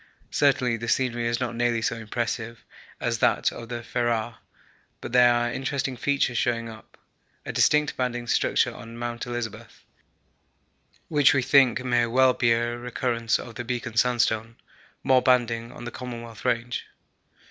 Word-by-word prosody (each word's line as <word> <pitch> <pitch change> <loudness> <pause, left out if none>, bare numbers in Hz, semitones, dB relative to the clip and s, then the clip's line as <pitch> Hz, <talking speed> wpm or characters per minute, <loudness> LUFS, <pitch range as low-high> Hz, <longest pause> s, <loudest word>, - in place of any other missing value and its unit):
Certainly 130 -5 +2
the 115 +1 -6
scenery 120 -1 0
is 120 0 0
not 120 -2 -2
nearly 120 -1 0
so 115 - 0
impressive 115 +1 -4 0.3
as - - -1
that - - +2
of 115 - -9
the 120 -1 -5
Ferrar, 120 -2 -1 0.6
but - - -7
there 125 0 +6
are 120 0 +1
interesting 135 0 -2
features 130 -2 0
showing 115 -1 0
up 110 -1 -14 0.5
a - - -5
distinct 150 -1 +3
banded 120 -2 -2
structure - - +2
on 115 +1 -10
Mount 120 0 -4
Elizabeth, 120 -3 -6 1.2
which 145 -2 +4
we 135 - +2
think 130 -2 +4
may 120 -1 +2
well 130 +2 +4
be 120 -2 +2
a 120 +1 +1
recurrence 120 -1 -1
of 115 - -9
the 120 - -5
Beacon 120 -1 -4
Sandstone 115 -1 +1 0.5
more 130 -1 +4
banding 120 -2 +1
on - - -10
the 120 - -5
Commonwealth 120 -3 -8
Range. 120 0 -1
120 Hz, 155 wpm, -25 LUFS, 115-125 Hz, 1.2 s, there